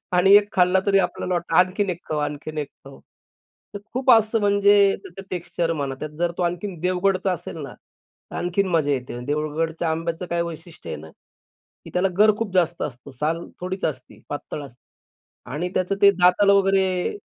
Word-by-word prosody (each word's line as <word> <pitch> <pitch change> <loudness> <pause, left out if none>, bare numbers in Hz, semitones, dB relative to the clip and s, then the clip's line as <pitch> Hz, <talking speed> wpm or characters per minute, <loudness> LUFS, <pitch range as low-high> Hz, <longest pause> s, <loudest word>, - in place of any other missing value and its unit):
आणि 180 +2 +5
1 205 0 +4
खाल्ला, 180 +1 +4
तरी 195 -1 +4
आपल्याला 185 -1 -1
वाटतं 170 -1 -2
आणखीन 185 +2 +3
1 175 - -4
खाऊ, 155 - 0
आणखीन 150 +1 -4
1 145 -2 -3 0.2
खाऊ 135 0 -13 0.7
तर 205 - -4
खूप 260 +1 +2
असं 225 0 +4
म्हणजे 200 -1 +4
त्याचं 185 +2 -10
टेक्स्चर 170 -1 -2
म्हणा, 140 -4 -3
त्यात 150 - -5
जर 175 0 +1
तो 180 - 0
आणखीन 175 +1 -3
देवगडचा 185 +1 +1
असेल 175 - -6
ना, - - -8 0.6
आणखीन 180 +2 0
मजा 160 -5 +1
येते. 125 -3 -3
देवगडच्या 155 +2 -1
आंब्याचं 165 +2 -3
काय 170 0 +1
वैशिष्ट्य 170 0 -8
आहे - - -3
ना, 80 +1 -12
की - - -21
त्याला 180 +2 +2
गर 215 0 +6
खूप 225 -4 -3
जास्त 175 -2 +1
असतो. 125 +1 -6
साल 155 +6 -2 0.2
थोडीच 185 +2 -4
असती, 135 -5 -5
पातळ 145 +1 -5
असते 125 -3 -15 0.7
आणि 165 +6 -2
त्याचं 185 +2 0
ते 200 - +8
दाताला 200 +2 +4
वगैरे 195 - +2
180 Hz, 175 wpm, -23 LUFS, 155-195 Hz, 0.7 s, ते